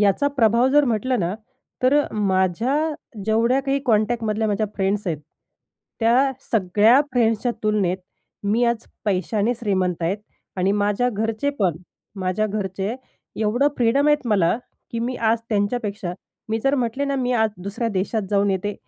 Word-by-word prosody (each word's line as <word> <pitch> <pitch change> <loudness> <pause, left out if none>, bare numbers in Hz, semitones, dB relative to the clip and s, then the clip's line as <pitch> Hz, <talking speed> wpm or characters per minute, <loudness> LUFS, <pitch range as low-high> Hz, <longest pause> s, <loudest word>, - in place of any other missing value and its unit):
याचा 205 +8 +3
प्रभाव 235 0 +4
जर 295 0 +5
म्हटलं 245 +1 0
ना, 175 +2 -1 0.5
तर 255 +2 +4
अ, - - -2
माझ्या 200 +5 +1 0.5
जेवढ्या 230 +5 +2
काही 275 +1 0
कॉन्टॅक्टमधल्या 220 -1 +1
माझ्या 210 +1 0
फ्रेंड्स 195 +1 0
आहेत, 165 -4 -1 0.8
त्या 250 +4 +4 0.2
सगळ्या 215 +4 +4
फ्रेंड्सच्या 235 -1 +2
तुलनेत 205 -4 +1 0.5
मी 220 +4 +2
आज 235 -1 0 0.2
पैशाने 205 +3 +1
श्रीमंत 185 -6 -1
आहेत 180 +5 0 0.4
आणि 190 +1 +2
माझ्या 205 +4 +1
घरचे 220 +5 -1
पण 180 -6 +1 0.4
माझ्या 185 +3 0
घरचे 200 0 -3 0.4
एवढं 230 +6 +2
फ्रीडम 250 +4 +3
आहेत 295 -3 +2
मला 195 -3 +3 0.3
की 230 - -3
मी 245 +2 -2
आज 225 0 +2
त्यांच्यापेक्षा, 205 -3 -1 0.4
मी 220 +1 0
जर 275 +1 +3
म्हटले 255 +1 -1
ना 280 0 -1
मी 250 -1 0
आज 220 -2 +2
दुसऱ्या 200 +4 -2
देशात 205 +3 -1
जाऊन 200 0 +2
येते 195 +2 -2
215 Hz, 150 wpm, -22 LUFS, 200-240 Hz, 0.8 s, जर